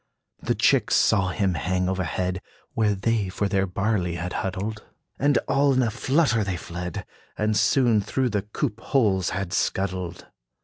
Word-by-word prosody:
The - - 0
chicks - - +3
saw 95 -3 +3
him 95 -1 0
hang 90 +2 -1
overhead, 95 0 -2 0.3
Where 105 -2 +2
they 100 0 0
for 100 +2 -1
their 95 -1 +1
barley 95 -2 -1
had 90 +2 -4
huddled; 100 +3 -3 0.4
And 145 0 +3
all 140 0 +3
in 130 0 +3
a 115 - 0
flutter 130 -1 +2
they 95 -3 -2
fled, 90 0 -6 0.3
And 105 0 +1
soon 110 +2 +3
through 125 +5 -1
the 105 -2 0
coop 105 +3 -3
holes 100 - +1
had 95 -2 -3
scuddled. 90 -3 -2
100 Hz, 160 wpm, -25 LUFS, 95-110 Hz, 0.4 s, chicks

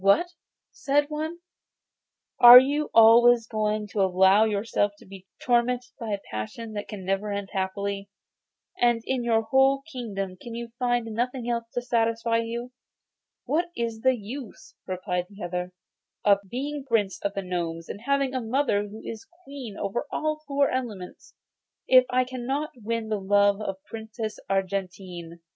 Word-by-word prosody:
'What!' 200 - +4 0.4
said 290 +1 0
one, 315 +3 -4 1.0
'are 240 0 +12
you 290 +3 0
always 230 +1 +7
going 215 -1 -1
to 200 - -1
allow 190 +3 +5
yourself 205 -1 0
to - - -17
be 190 0 -13
tormented 245 0 +1
by 230 -3 -5
a 200 -1 -1
passion 160 - -6
which 205 -1 -5
can 200 -4 -8
never 195 +2 -1
end 200 -1 -4
happily, 200 +1 -3 0.7
and 240 -2 +2
in 260 -2 -1
your 225 -1 +2
whole 270 +4 +3
kingdom 195 - -5
can 235 -1 -8
you 235 0 -6
find 245 -2 +1
nothing 240 +2 -3
else 235 -1 -1
to 245 - -1
satisfy 230 -1 +1
you?' 235 +2 -4 0.7
'What 340 +4 0
is 230 -2 -3
the 260 0 +3
use,' 230 +2 -9
replied 180 -1 -2
the 200 -1 -10
other, 180 +1 -4 0.5
'of 200 -1 +5
being 280 +4 -4
Prince 225 -7 0
of 200 0 -2
the 195 - -2
Gnomes, 170 -2 -4
and 205 - -7
having 275 +1 0
a 260 - -1
mother 225 -3 0
who 215 +2 -11
is 225 -1 -7 0.2
queen 270 - -8
over 210 +8 -3
all 310 0 -1
the 305 - -29
four 280 0 +2
elements, 220 -8 -6 0.5
if 255 -1 +7
I 255 0 +2
cannot 260 +4 -3
win 230 -1 -3
the 210 -2 -1
love 200 +1 +3
of 195 -2 -3
the 190 - -36
Princess 220 -1 -6
Argentine? 185 -3 -3
225 Hz, 160 wpm, -26 LUFS, 200-250 Hz, 1.0 s, are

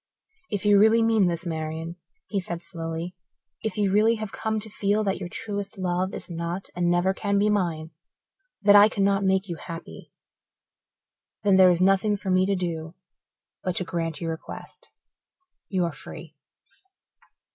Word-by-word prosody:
"If 205 0 -3
you 205 -1 +6
really 220 +2 +5
mean 220 -4 +4
this, 170 +1 -2
Marian," 160 0 -4 0.3
he 200 - -1
said 175 -2 -5
slowly, 165 +2 -5 0.5
"if 220 - -3
you 205 -2 +2
really 215 +3 +4
have 215 -2 -5
come 220 0 -2
to 220 - -3
feel 205 0 0
that 195 -3 -1
your 180 -2 -5
truest 205 +1 -5
love 185 0 -1
is - - -6
not 170 +2 -4
and 175 0 +1
never 175 +2 +2
can 200 0 0
be 210 +1 +3
mine 170 -6 -1 0.7
that 205 0 +7
I 205 +1 +9
cannot 200 -1 +1
make 190 0 +2
you 170 -3 -5
happy 165 +2 -9 1.3
then 200 -2 +5
there 185 -1 +8
is 175 0 +2
nothing 195 +2 +3
for 195 -1 -3
me 185 +1 +3
to 200 - +2
do 165 -2 -4 0.7
but 185 -1 -1
to 185 - +1
grant 165 -3 -3
your 165 -1 -2
request. 160 - -8 0.8
You 185 -3 +1
are 170 - -2
free." 155 +2 -11
190 Hz, 170 wpm, -25 LUFS, 170-205 Hz, 1.3 s, I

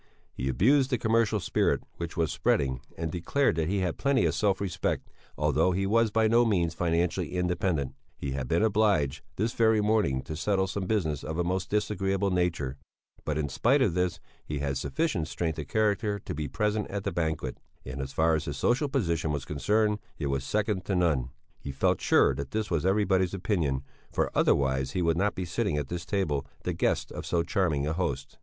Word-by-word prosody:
He 65 +2 -3
abused 130 - +3
the 125 - +1
commercial 110 -1 +2
spirit - - +1
which 85 0 -5
was 80 -3 +1
spreading, 65 -2 +1 0.2
and 80 -1 -3
declared 90 - +1
that 80 0 0
he 100 0 0
had 90 -3 -2
plenty 140 -1 +2
of - - +1
self 100 -3 +1
respect, 100 -3 -2 0.3
although 95 - +2
he 95 +2 0
was 115 +3 +3
by 110 +1 +3
no 115 +2 +5
means 90 -8 +1
financially 85 0 0
independent; 90 -5 0 0.2
he 70 - -4
had 65 -2 -3
been 85 - +2
obliged, 100 -10 +2
this 110 +4 -1
very 110 -1 +3
morning, 105 -11 +1
to 80 - -6
settle 95 +4 +1
some 95 0 -3
business 80 -10 0
of 80 +1 -4
a 90 - +1
most 90 +2 -2
disagreeable 100 -2 0
nature 85 -7 0 0.5
but 75 -1 -1
in 75 -1 0
spite 120 - +2
of 100 - +1
this 90 -1 0 0.2
he 75 - -4
had 70 -1 -1
sufficient 105 - -1
strength 80 -1 -2
of 75 - -5
character 105 -1 +1
to 100 - -6
be 75 0 -3
present 105 +9 -1
at 100 -1 -4
the - - -1
banquet; 80 -6 -2 0.3
and 65 +2 -5
as 65 0 -5
far 80 +3 +2
as 80 -1 0
his 70 -2 -4
social 135 - +1
position 85 - 0
was 70 -2 -3
concerned, 105 +8 +1 0.2
it 75 - -3
was 70 0 -1
second 105 - -1
to 95 0 -1
none 80 -8 +1 0.3
he 70 - -6
felt 65 - +1
sure - - +4
that 70 +1 -5
this 110 -2 -2
was 85 +1 +1
everybody's 95 -2 +2
opinion, 85 -9 0 0.3
for - - 0
otherwise 65 -1 +2
he 90 - 0
would 85 -1 +2
not 100 +4 +1
be 95 - -3
sitting 95 -1 -1
at 75 -2 -3
this 85 0 -5
table, 75 -9 0 0.2
the - - -1
guest - - 0
of - - -6
so 85 -1 0
charming 85 -5 0
a 80 - 0
host. 90 +2 -3
90 Hz, 205 wpm, -28 LUFS, 75-105 Hz, 0.5 s, no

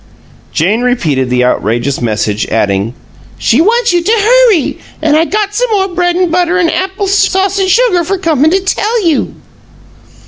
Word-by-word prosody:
Jane 200 +9 0
repeated 155 - 0
the 125 0 +1
outrageous 120 +3 -1
message, 110 -2 -2
adding, 105 +1 -1 0.4
"She 245 +7 +2
wants 465 +3 +2
you 350 - +2
to 400 - -1
hurry 455 - +2 0.2
and 305 -1 +1
I 320 +2 +3
got 415 +2 -2
some - - -1
more 390 -3 0
bread 355 -1 -1
and 360 -2 0
butter 355 +1 +1
and 345 -3 +1
apple 385 +2 -2
sauce 390 0 +1
and 380 -1 0
sugar 375 -4 +2
for 390 +4 -2
comin' 315 -5 +1
to 380 +3 +1
tell 420 +3 -1
you." 320 -4 0
350 Hz, 170 wpm, -11 LUFS, -, 0.4 s, I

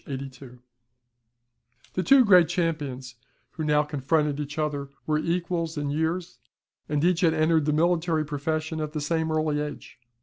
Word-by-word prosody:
82.] 135 -2 -8 1.4
The 185 - 0
two 265 +5 +6
great 180 -5 +6
champions, 145 -8 -3 0.3
who 160 - -5
now 150 -1 +3
confronted 150 0 0
each 150 0 -5
other, 145 -3 -2 0.2
were 155 0 +1
equals 170 -1 -2
in 145 -1 -2
years, 160 -2 -2 0.5
and 150 0 0
each 180 0 +2
had 165 -3 +3
entered 155 -1 +2
the 150 - +2
military 165 0 +1
profession 155 +2 -3
at 150 0 -4
the 155 - -2
same 160 +1 -1
early 155 -1 0
age. 150 -3 -7
155 Hz, 155 wpm, -26 LUFS, 145-165 Hz, 1.4 s, two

